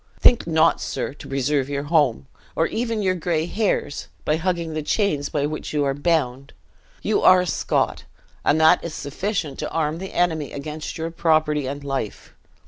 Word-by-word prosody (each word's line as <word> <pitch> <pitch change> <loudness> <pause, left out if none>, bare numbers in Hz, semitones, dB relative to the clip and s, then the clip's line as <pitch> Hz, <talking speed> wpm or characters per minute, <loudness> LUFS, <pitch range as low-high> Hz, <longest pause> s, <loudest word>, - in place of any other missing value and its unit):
Think 240 - +5
not, 160 -1 +3
sir, 130 0 -3
to 145 - -11
preserve 135 0 0
your 140 0 -2
home, 145 - +2 0.3
or - - +2
even 230 -2 -2
your 185 -1 +2
gray 170 -3 -1
hairs, 195 -6 -1 0.2
by 150 - +2
hugging 170 -1 -1
the 155 - -2
chains 150 -4 0
by 145 -1 0
which 155 +1 -4
you 150 -1 +2
are 135 -1 +1
bound. 140 -3 0 0.5
You 215 - +1
are 185 0 +7
a - - -2
Scot, 175 - 0 0.4
and 155 - +3
that 160 0 +5
is 170 -2 -5
sufficient 175 0 -3
to - - -3
arm 160 0 -1
the 190 +1 -7
enemy 160 -5 0
against 150 +2 -6
your 165 +1 -3
property 155 -4 +2
and 140 +1 -5
life. 135 -6 -4
155 Hz, 180 wpm, -23 LUFS, 145-170 Hz, 0.5 s, are